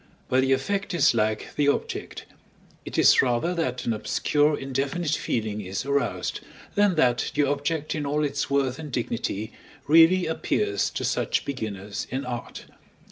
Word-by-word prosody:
But 130 Hz, +1 st, +3 dB
the 135 Hz, 0 st, +1 dB
effect 195 Hz, +8 st, 0 dB
is 150 Hz, -, +4 dB
like 110 Hz, -1 st, 0 dB
the 145 Hz, -1 st, +2 dB
object; 145 Hz, -, -2 dB, 0.6 s
it -, -, -6 dB
is -, -, +6 dB
rather 125 Hz, +7 st, 0 dB
that 130 Hz, -8 st, -2 dB
an 115 Hz, -, +1 dB
obscure 145 Hz, +7 st, +1 dB
indefinite 140 Hz, +5 st, -2 dB
feeling 110 Hz, -8 st, -1 dB
is 95 Hz, +3 st, -4 dB
aroused, 140 Hz, 0 st, -1 dB, 0.3 s
than 205 Hz, -3 st, +3 dB
that 125 Hz, -6 st, +2 dB
the 145 Hz, -, +3 dB
object 145 Hz, +2 st, -1 dB
in 155 Hz, -, -3 dB
all 150 Hz, +1 st, 0 dB
its 140 Hz, -1 st, -1 dB
worth 135 Hz, -1 st, 0 dB
and 150 Hz, -3 st, -7 dB
dignity 115 Hz, -3 st, -3 dB, 0.3 s
really 165 Hz, +4 st, +6 dB
appears 400 Hz, -, 0 dB
to -, -, -4 dB
such -, -, 0 dB
beginners 105 Hz, -7 st, -5 dB
in 130 Hz, +2 st, -3 dB
art. 120 Hz, -1 st, -6 dB
140 Hz, 155 wpm, -25 LUFS, 120-155 Hz, 0.6 s, is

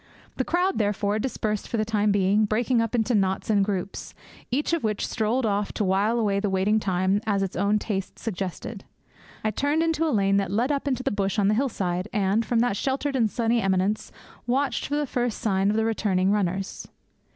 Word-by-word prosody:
The 260 Hz, -, +1 dB
crowd, 360 Hz, +4 st, 0 dB
therefore, 205 Hz, 0 st, 0 dB
dispersed 215 Hz, -3 st, -2 dB
for 235 Hz, -, -2 dB
the 215 Hz, -, +1 dB
time 210 Hz, -1 st, +1 dB
being, 200 Hz, +2 st, +3 dB
breaking 230 Hz, +3 st, +1 dB
up 230 Hz, +1 st, -1 dB
into 235 Hz, +1 st, +1 dB
knots 195 Hz, 0 st, +1 dB
and 200 Hz, -2 st, +4 dB
groups, 195 Hz, -1 st, -4 dB, 0.3 s
each 290 Hz, +6 st, 0 dB
of 335 Hz, -, 0 dB
which 215 Hz, -2 st, -1 dB
strolled 230 Hz, +2 st, 0 dB
off 205 Hz, -1 st, -1 dB
to -, -, -1 dB
while 200 Hz, +4 st, +2 dB
away 205 Hz, -3 st, +1 dB
the 205 Hz, 0 st, -1 dB
waiting 195 Hz, +3 st, +2 dB
time 190 Hz, 0 st, +1 dB
as 200 Hz, -2 st, +1 dB
its 190 Hz, -, -4 dB
own 200 Hz, +3 st, +2 dB
taste 200 Hz, -3 st, -4 dB
suggested. 195 Hz, 0 st, -5 dB, 0.6 s
I 215 Hz, -, +1 dB
turned 290 Hz, +7 st, +1 dB
into 325 Hz, -1 st, +1 dB
a -, -, +1 dB
lane 200 Hz, -6 st, +2 dB
that 195 Hz, -2 st, 0 dB
led 235 Hz, +8 st, +1 dB
up 285 Hz, 0 st, -2 dB
into 255 Hz, -2 st, -1 dB
the -, -, 0 dB
bush 200 Hz, 0 st, -1 dB
on 200 Hz, -1 st, +3 dB
the -, -, +3 dB
hillside, 195 Hz, -7 st, -1 dB
and, 205 Hz, 0 st, +1 dB
from 230 Hz, 0 st, +1 dB
that 240 Hz, -4 st, +1 dB
sheltered 275 Hz, +3 st, -1 dB
and 230 Hz, -4 st, +2 dB
sunny 230 Hz, +1 st, +1 dB
eminence, 195 Hz, +2 st, 0 dB, 0.4 s
watched 270 Hz, +3 st, 0 dB
for 290 Hz, -, -1 dB
the 295 Hz, 0 st, 0 dB
first 245 Hz, -3 st, -1 dB
sign 195 Hz, -2 st, +1 dB
of 210 Hz, -, +1 dB
the 220 Hz, 0 st, +1 dB
returning 200 Hz, -4 st, +1 dB
runners. 195 Hz, -1 st, -2 dB
210 Hz, 205 wpm, -25 LUFS, 195-240 Hz, 0.6 s, and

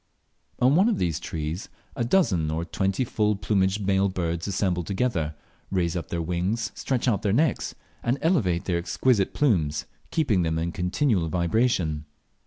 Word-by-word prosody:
On 130 Hz, +2 st, +4 dB
one 195 Hz, +7 st, +5 dB
of 225 Hz, -, +1 dB
these 85 Hz, -3 st, 0 dB
trees 80 Hz, +1 st, -4 dB, 0.3 s
a 125 Hz, -, -1 dB
dozen 115 Hz, -, +2 dB
or 80 Hz, +2 st, -2 dB
twenty 95 Hz, +7 st, 0 dB
full 105 Hz, -2 st, +1 dB
plumaged 100 Hz, 0 st, +1 dB
male 100 Hz, 0 st, +3 dB
birds 85 Hz, -2 st, -2 dB
assemble 95 Hz, -3 st, 0 dB
together, 95 Hz, -6 st, -1 dB, 0.3 s
raise 90 Hz, -3 st, 0 dB
up 85 Hz, -, -3 dB
their 85 Hz, -1 st, -2 dB
wings, 95 Hz, +8 st, -1 dB
stretch 130 Hz, -2 st, -1 dB
out 105 Hz, -6 st, +2 dB
their 100 Hz, -, +1 dB
necks, 145 Hz, +5 st, +1 dB, 0.3 s
and 120 Hz, +3 st, 0 dB
elevate 105 Hz, -, +1 dB
their 85 Hz, -2 st, 0 dB
exquisite 95 Hz, +5 st, +1 dB
plumes, 80 Hz, -, +1 dB, 0.2 s
keeping 130 Hz, -, +2 dB
them 80 Hz, -1 st, 0 dB
in 85 Hz, +1 st, -1 dB
a -, -, -5 dB
continual 90 Hz, -, 0 dB
vibration. 85 Hz, -3 st, +1 dB
95 Hz, 165 wpm, -26 LUFS, 85-115 Hz, 0.3 s, one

